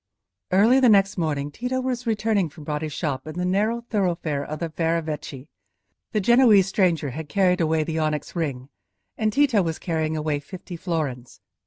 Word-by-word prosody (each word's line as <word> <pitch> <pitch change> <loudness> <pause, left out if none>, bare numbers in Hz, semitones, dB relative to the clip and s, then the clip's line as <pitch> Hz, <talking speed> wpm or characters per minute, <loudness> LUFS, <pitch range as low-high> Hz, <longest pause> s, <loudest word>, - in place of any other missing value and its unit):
Early 215 +8 +5
the 255 -2 +5
next 200 -1 +4
morning 145 -3 -1
Tito 250 - -3
was 250 -1 -3
returning 215 -5 +1
from 150 0 -13
Bratti's 150 +1 -3
shop 145 -2 -3
in 155 - -7
the 180 - -1
narrow 210 +6 +1
thoroughfare 175 -10 -1
of 155 +1 -5
the 165 0 -4
Ferravecchi. 155 -4 -3 0.6
The 215 - +1
Genoese 225 -2 +5
stranger 170 -8 +1
had 150 +3 -7
carried 180 +1 +2
away 160 -1 +2
the 160 +1 -3
onyx 155 +1 -2
ring, 140 -6 -3 0.5
and 215 0 0
Tito 260 -4 +3
was 165 -3 -2
carrying 160 -2 -2
away 150 -1 -1
fifty 175 +4 -9
florins. 150 -8 -4
170 Hz, 170 wpm, -24 LUFS, 155-205 Hz, 0.6 s, Early